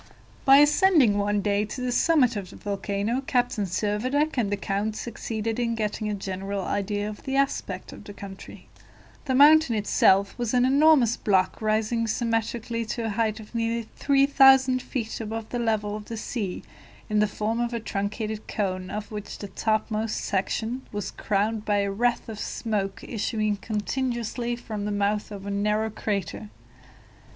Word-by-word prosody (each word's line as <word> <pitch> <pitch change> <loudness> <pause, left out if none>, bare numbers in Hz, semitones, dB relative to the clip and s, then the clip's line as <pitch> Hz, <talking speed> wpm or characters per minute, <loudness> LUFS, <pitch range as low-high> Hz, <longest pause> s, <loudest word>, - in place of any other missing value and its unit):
By 270 0 +8
ascending 295 - +5
one 205 0 +1
day 205 0 +1
to 215 +4 -6
the 250 0 -1
summit 255 -3 +3
of 195 -3 -5
the - - -12
volcano, 200 +4 -2
Captain 245 -5 +1
Servadac 220 - 0
and 225 -6 0
the 205 - 0
count 205 +3 -2
succeeded 225 0 -4
in 230 -1 0
getting 215 -1 -2
a 210 - -1
general 195 0 -4
idea 205 +2 -2
of 210 0 -7
the 270 -1 -3
aspect 270 -9 -1
of - - -11
the 205 - -8
country. 200 -1 -10 0.6
The 260 - 0
mountain 295 -2 +6
itself 200 -1 +3
was 240 0 -1
an 245 0 +4
enormous 275 -3 +5
block 190 -1 +1
rising 220 +2 +1
symmetrically 230 0 -1
to 225 +1 -3
a - - -1
height 220 +1 0
of 215 +1 -12
nearly 230 -1 -1
3,000 270 -2 +5
feet 230 -3 -4
above 225 0 -5
the 245 - -3
level 215 -3 0
of 210 - -10
the 230 - -6
sea, 210 -4 -4 0.4
in 210 0 +1
the 210 - +4
form 215 +3 -2
of 240 0 0
a 235 - -2
truncated 215 +1 -4
cone, 185 -3 -2
of 210 +1 -5
which 210 -1 -6
the 205 - -7
topmost 215 +1 -1
section 220 +5 -2
was 205 -2 -4
crowned 210 +1 -1
by 205 -1 +1
a 200 0 -1
wreath 240 +4 0
of 220 -2 -7
smoke 205 -5 -3
issuing 215 -1 -1
continuously 235 +2 -2
from 215 -3 -5
the 210 - -2
mouth 205 +1 0
of 200 -2 -8
a 200 - -3
narrow 210 +2 0
crater. 185 - -3
215 Hz, 170 wpm, -26 LUFS, 205-240 Hz, 0.6 s, By